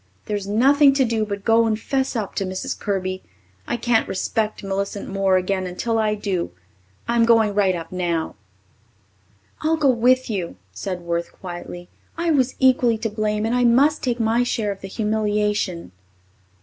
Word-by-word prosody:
There's 205 -2 -3
nothing 275 +7 +5
to 270 -2 +3
do 225 -2 -1
but 200 -1 -5
go 230 0 +4
and 215 -1 0
'fess 265 +2 -1
up 215 -4 -3
to 200 - -1
Mrs. 185 0 -4
Kirby. 185 -2 -2 0.5
I - - -1
can't 235 -1 +1
respect 215 +3 -2
Millicent 200 +1 -3
Moore 195 -1 +2
again 185 0 -1
until 225 +6 -1
I 215 -1 +1
do. 195 -4 -2 0.6
I'm 235 0 +3
going 225 -2 +4
right 195 -2 +2
up 165 -1 -7
now." 170 -3 -2 1.3
"I'll 320 +1 +1
go 285 -4 +4
with 255 +2 +3
you," 185 - -3 0.2
said 180 - -5
Worth 170 0 -3
quietly. 175 -1 -8 0.3
"I 335 0 +1
was 260 -4 +2
equally 250 -3 +3
to 225 +1 -2
blame 210 0 -1
and 225 - 0
I 250 0 +2
must 270 +6 +4
take 245 -2 -1
my 225 +1 +2
share 225 -4 -1
of 195 - -8
the 195 - -6
humiliation." 210 - -1
215 Hz, 170 wpm, -22 LUFS, 195-235 Hz, 1.3 s, nothing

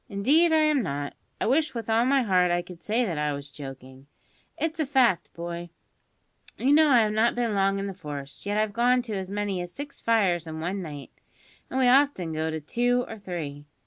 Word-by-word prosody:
"Indeed 285 +12 +3
I - - +4
am 305 -3 +3
not. 145 -7 -3 0.3
I - - -1
wish 280 +3 +1
with 230 -2 -4
all 225 +1 +3
my 270 0 +3
heart 180 -4 +3
I 175 0 +1
could 175 -1 -12
say 230 +3 0
that 170 -7 -3
I 150 -1 0
was 140 0 -7
joking. 135 -1 -10 0.5
It's 320 0 -2
a 310 - +1
fact, 255 -9 +2
boy. 170 0 -6 0.9
You 275 +3 +3
know 310 +1 +6
I 245 -4 +6
have 210 -1 0
not 225 +2 +2
been 240 -3 0
long 195 0 +2
in 195 - -3
the 195 - -4
force, 145 -6 -8
yet 205 +1 -1
I've 215 -1 0
gone 245 +2 +3
to 225 -3 -6
as 190 -2 -4
many 200 -2 -2
as 175 0 -6
six 285 +6 -8
fires 190 -7 +2
in 160 0 -6
one 185 +4 -3
night, 145 -5 -8 0.6
and 260 - -3
we 255 - +4
often 250 - +3
go 160 +1 -1
to 160 0 -3
two 245 +10 0
or 225 - -8
three. 150 -7 -6
200 Hz, 220 wpm, -26 LUFS, 165-245 Hz, 0.9 s, know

